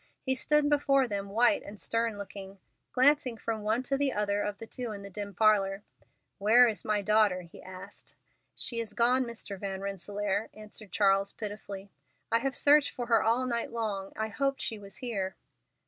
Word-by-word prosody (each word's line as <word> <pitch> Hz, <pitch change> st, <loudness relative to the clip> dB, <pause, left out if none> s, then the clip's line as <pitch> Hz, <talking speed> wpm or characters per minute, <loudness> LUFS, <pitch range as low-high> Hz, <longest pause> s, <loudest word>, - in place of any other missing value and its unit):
He 260 Hz, -, +3 dB
stood 300 Hz, +3 st, +2 dB
before 275 Hz, -2 st, +3 dB
them 200 Hz, -2 st, -3 dB
white 235 Hz, +4 st, +4 dB
and 200 Hz, 0 st, -10 dB
stern 230 Hz, +2 st, -1 dB
looking, 195 Hz, -1 st, -8 dB, 0.3 s
glancing 260 Hz, -2 st, +4 dB
from 220 Hz, -1 st, -3 dB
one 220 Hz, +4 st, 0 dB
to 275 Hz, +1 st, -1 dB
the 285 Hz, -1 st, +2 dB
other 205 Hz, 0 st, 0 dB
of 205 Hz, 0 st, -3 dB
the 225 Hz, -, -8 dB
two 245 Hz, 0 st, -5 dB
in 200 Hz, -1 st, -7 dB
the 200 Hz, -, -9 dB
dim 200 Hz, 0 st, -6 dB
parlor. 200 Hz, -1 st, +3 dB, 0.6 s
"Where 230 Hz, +5 st, +6 dB
is 215 Hz, -6 st, -2 dB
my 210 Hz, -1 st, 0 dB
daughter?" 210 Hz, -3 st, +3 dB
he 170 Hz, -, -14 dB
asked. 185 Hz, 0 st, -11 dB, 0.4 s
"She 235 Hz, -, -1 dB
is 230 Hz, -2 st, -4 dB
gone, 250 Hz, +2 st, +3 dB
Mr. 220 Hz, -4 st, -7 dB
Van 195 Hz, -1 st, -4 dB
Rensselaer," 200 Hz, +1 st, -2 dB
answered 215 Hz, -1 st, -8 dB
Charles 195 Hz, -1 st, +2 dB
pitifully. 205 Hz, -2 st, -7 dB, 0.4 s
"I 230 Hz, -, +4 dB
have 270 Hz, +1 st, -2 dB
searched 295 Hz, 0 st, +5 dB
for 245 Hz, -, -5 dB
her 235 Hz, -1 st, +3 dB
all 235 Hz, +3 st, +2 dB
night 235 Hz, -2 st, -1 dB
long. 210 Hz, -4 st, -3 dB
I 220 Hz, 0 st, -2 dB
hoped 275 Hz, +5 st, -1 dB
she 220 Hz, -, -2 dB
was 200 Hz, -1 st, -7 dB
here." 200 Hz, -7 st, -3 dB
215 Hz, 185 wpm, -30 LUFS, 200-240 Hz, 0.6 s, Where